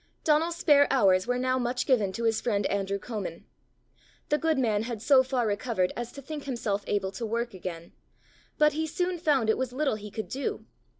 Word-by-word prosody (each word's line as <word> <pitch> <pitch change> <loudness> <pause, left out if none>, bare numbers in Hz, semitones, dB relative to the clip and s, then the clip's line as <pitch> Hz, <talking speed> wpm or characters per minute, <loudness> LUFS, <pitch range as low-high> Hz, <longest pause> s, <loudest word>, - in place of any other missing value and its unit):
Donal's 320 +2 +2
spare 290 -5 +5
hours 195 -7 +3
were 245 0 +1
now 255 +1 +1
much 245 0 -1
given 220 -8 +2
to 230 - -4
his 225 -1 +1
friend 205 -4 0
Andrew 200 0 -1
Comin. 200 -6 -6 0.8
The 300 - +2
good 320 -2 +1
man 220 -5 +1
had 230 -1 -4
so 260 +4 +5
far 260 -2 -1
recovered 205 -3 0
as 240 0 -5
to 280 - -10
think 295 +1 -6
himself 220 -6 -2
able 195 -2 -1
to 200 +4 -7
work 235 +1 -2
again; 170 -2 -7 0.7
but 300 -1 +4
he 315 +1 -1
soon 355 +2 -2
found 285 -8 +2
it 220 - +2
was 260 -1 -2
little 270 -3 0
he 210 0 -9
could 220 +1 -5
do. 270 +1 -4
240 Hz, 200 wpm, -28 LUFS, 205-280 Hz, 0.8 s, spare